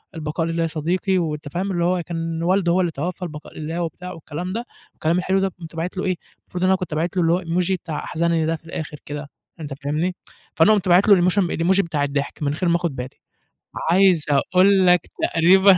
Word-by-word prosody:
"البقاء 160 +1 -2
لله 165 0 -1
يا - - +1
صديقي." 175 +5 0
وأنت 150 -3 -2
فاهم 190 +5 -2
اللي 175 -2 0
هو 180 -1 +1
كان 165 -1 -3
والده 180 -1 +2
هو 185 +2 +3
اللي 175 - 0
توفى 170 +5 -4
البقاء 150 -3 -8
لله 165 +3 -3
وبتاع 180 +2 -5
والكلام 165 +3 -6
ده 235 +2 -3 0.3
والكلام 165 +3 0
الحلو 190 +1 +1
ده، 195 - +2
قُمت 165 -1 -10
باعت 170 +4 -4
له 190 - -1
إيه، 185 -1 +1 0.2
المفروض 180 0 -6
إن 185 - +4
أنا 190 - +4
كنت 180 -4 -5
باعت 170 +4 -1
له - - +4
اللي 165 - +3
هو 180 - +1
الemoji 175 +2 0
بتاع 165 -4 -4
أحزنني 165 -1 0
ده 165 - 0
في 165 - -14
الآخر 155 -2 -6
كده، 145 0 -6 0.3
أنت 145 -3 -5
فاهمني، 155 +6 -1 0.4
فأنا 165 +7 +5
قُمت 195 -3 0
باعت 180 +4 +5
له 205 - +8
الاموشن 180 +1 +2
الemoji 185 +4 +3
بتاع 160 -5 -2
الضحك 145 +1 -2
من 140 - +1
غير 175 +3 0
ما 170 - +3
آخد 170 -6 -3
بالي، 125 0 -5 0.8
عايز 180 -3 +4
أقول 185 +6 +4
لك 180 -2 +6 0.3
تقريبًا 185 +3 +6
170 Hz, 225 wpm, -22 LUFS, 160-185 Hz, 0.8 s, له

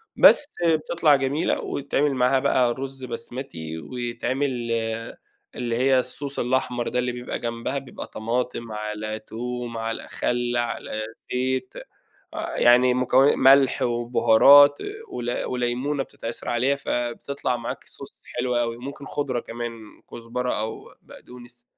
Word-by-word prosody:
بس 295 - +7 0.2
آآ، 165 -1 +5
بتطلع 155 -1 +3
جميلة، 140 +4 0
ويتعمل 145 +1 0
معاها 125 +1 +3
بقى 130 -3 +2
رز 135 +1 -7
بسمتي، 115 - -6
ويتعمل 120 - -3
آآ، 115 0 -3 0.4
اللي 120 -2 -2
هي 130 0 +3
الSauce 140 +2 -4
الأحمر 125 -1 0
ده 125 - 0
اللي 125 0 0
بيبقى 125 0 -5
جنبها، 115 +3 -3
بيبقى 135 -2 -7
طماطم 115 0 -3
على 105 0 -4
توم 120 +1 -5
على 115 0 -4
خل 120 0 -1
على 120 -2 -3 0.3
زيت، 130 0 -1 0.6
آآ، - - -4
يعني 125 +1 +6
مكونا 130 +2 +4
ملح 135 0 +5
وبهارات 120 +4 +6 0.3
ول 120 - -3
وليمونة 125 +3 -1
بتتعصر 115 -3 -7
عليها، 130 +4 +2
فبتطلع 125 0 -2
معاك 120 -1 -6
Sauce - - -11 0.2
حلو 125 0 0
أوي، 115 -1 0
ممكن 140 +3 -8
خضرة 135 -4 -2
كمان، 120 0 -5 0.4
كزبرة 120 +1 -3
أو 110 +1 -6
بقدونس. 120 -1 -14
125 Hz, 130 wpm, -24 LUFS, 120-135 Hz, 0.6 s, بس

